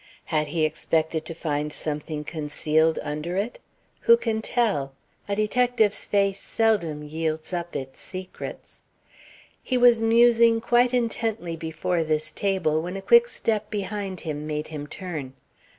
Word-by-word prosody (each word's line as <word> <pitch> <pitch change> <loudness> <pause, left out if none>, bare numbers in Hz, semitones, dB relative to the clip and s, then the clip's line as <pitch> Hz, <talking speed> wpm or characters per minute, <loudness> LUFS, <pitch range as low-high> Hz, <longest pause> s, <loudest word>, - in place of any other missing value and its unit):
Had 155 -1 +2
he 155 +1 +1
expected 160 +1 -1
to 165 - -6
find 150 -2 -2
something 150 0 -4
concealed 155 +1 +1
under 155 +5 -3
it? 215 +5 -2 0.4
Who 465 0 +6
can 220 - -1
tell? 200 - 0 0.4
A 200 - +1
detective's 220 0 +2
face 200 -1 +1
seldom 185 -10 0
yields 160 +2 -3
up 175 -1 -4
its 135 0 -6
secrets. 185 0 -8 0.8
He 255 - 0
was 240 -2 +6
musing 230 0 +5
quite 240 +2 +3
intently 225 -7 -1
before 165 +2 -1
this 155 0 -1
table 175 -6 0
when 180 +3 -5
a - - -6
quick 475 0 +6
step 215 - -2
behind 200 -2 -4
him 150 -2 -4
made 150 0 -3
him 150 -2 -6
turn. 155 -7 -6
175 Hz, 140 wpm, -25 LUFS, 155-220 Hz, 0.8 s, Who